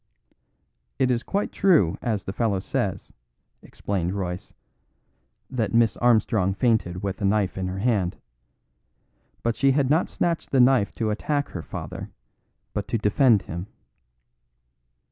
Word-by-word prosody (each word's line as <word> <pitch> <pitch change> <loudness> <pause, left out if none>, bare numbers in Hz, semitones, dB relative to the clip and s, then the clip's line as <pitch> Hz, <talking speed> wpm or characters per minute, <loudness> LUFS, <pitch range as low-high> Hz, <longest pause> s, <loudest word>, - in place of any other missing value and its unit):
"It 130 -1 +2
is 120 -1 +1
quite 200 +9 -2
true, 155 - +3
as 110 -4 -1
this 95 - -5
fellow 110 -5 +1
says," - - -3 0.5
explained 95 -3 -3
Royce, 90 -2 -4 1.0
"that 115 -4 -2
Miss 115 -4 +4
Armstrong 110 -5 +2
fainted 100 -7 0
with 100 0 -3
a - - -2
knife 100 -1 +1
in 95 -1 -3
her 90 +1 -4
hand. 100 -4 0 1.3
But 115 -1 0
she 135 -1 +3
had 140 -1 +1
not 160 +4 +2
snatched 170 -2 -1
the 135 - +2
knife 125 -4 +4
to 110 -2 -1
attack 145 +6 -1
her 85 - -6
father, - - -7 0.6
but 105 -1 -3
to 115 +1 0
defend 110 0 +3
him." 85 +4 -6
110 Hz, 140 wpm, -25 LUFS, 95-125 Hz, 1.3 s, Miss